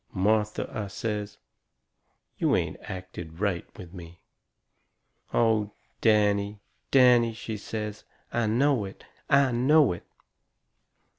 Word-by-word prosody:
"Martha," 105 +2 +1
I 110 -2 -3
says, 105 0 -4 1.0
"you - - +3
ain't - - -1
acted 90 -3 -8
right 100 -4 -1
with 90 -1 -11
me." 85 -2 -11 1.1
"Oh, 110 -3 +2 0.3
Danny, 105 -2 +2 0.3
Danny," 125 -3 +5
she 110 -1 -5
says, 105 0 -5 0.3
"I 120 -2 +1
know 125 +1 +2
it! 95 - -11 0.3
I 140 -2 +4
know 130 - +4
it!" 85 - -11
105 Hz, 105 wpm, -27 LUFS, 100-115 Hz, 1.1 s, Danny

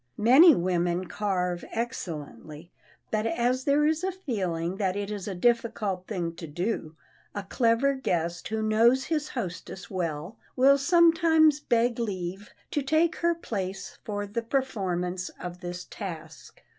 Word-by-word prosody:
Many 270 +9 +7
women 175 0 0
carve 180 -3 -2
excellently, 165 -7 -6 0.4
but 215 +1 0
as 240 +3 0
there 290 +1 +3
is 315 +2 +1
a 380 - 0
feeling 190 - -3
that 190 -2 0
it 205 0 -3
is 205 -2 -5
a 195 - -3
difficult 210 -3 0
thing 175 -6 -3
to 165 - -7
do, 165 0 -3 0.4
a 205 - -3
clever 235 +6 +2
guest 170 -10 -2
who 220 0 -2
knows 230 +4 +4
his 305 -1 -1
hostess 190 -4 -6
well, 170 +2 -4 0.2
will 275 +2 +5
sometimes 325 -1 +5
beg 235 -3 +1
leave 195 -2 -4 0.2
to 295 - 0
take 315 +4 +2
her 340 0 +1
place 195 - -5
for 205 -1 -3
the 205 +3 -3
performance 185 -8 -2
of 180 0 -7
this 180 0 -5
task. 165 -6 -9
210 Hz, 145 wpm, -27 LUFS, 180-260 Hz, 0.4 s, Many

